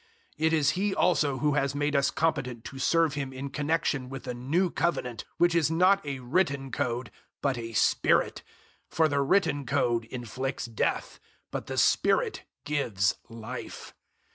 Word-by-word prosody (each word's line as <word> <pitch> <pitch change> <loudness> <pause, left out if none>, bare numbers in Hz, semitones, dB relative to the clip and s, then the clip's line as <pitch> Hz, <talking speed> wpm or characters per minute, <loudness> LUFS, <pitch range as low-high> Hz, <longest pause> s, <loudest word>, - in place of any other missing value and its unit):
003:006 160 - +1
It 160 - +1
is 150 -3 +3
He 195 +1 -1
also 150 -6 +2
who 150 +2 +1
has 140 -1 0
made 145 +1 0
us 140 -1 +3
competent 135 -8 -1
to 135 - -8
serve 165 +1 +3
Him 140 -2 -3
in 135 +1 -6
connexion 145 -3 -1
with 135 -1 -7
a 125 - -3
new 155 +10 0
Covenant, 135 -8 -1
which 175 -1 +4
is 165 -3 +3
not 185 +4 +4
a 140 -2 -4
written 140 -1 0
code 120 0 -2 0.3
but 135 -2 0
a 115 -1 -6
Spirit; - - +2 0.5
for 160 -1 +3
the 140 -2 +1
written 145 -1 +2
code 120 -2 +1
inflicts 130 +3 -4
death, 115 -2 -2 0.3
but - - -4
the - - -4
Spirit - - +2 0.2
gives 115 -9 +1 0.2
Life. 115 -1 -8
140 Hz, 165 wpm, -28 LUFS, 125-160 Hz, 0.5 s, which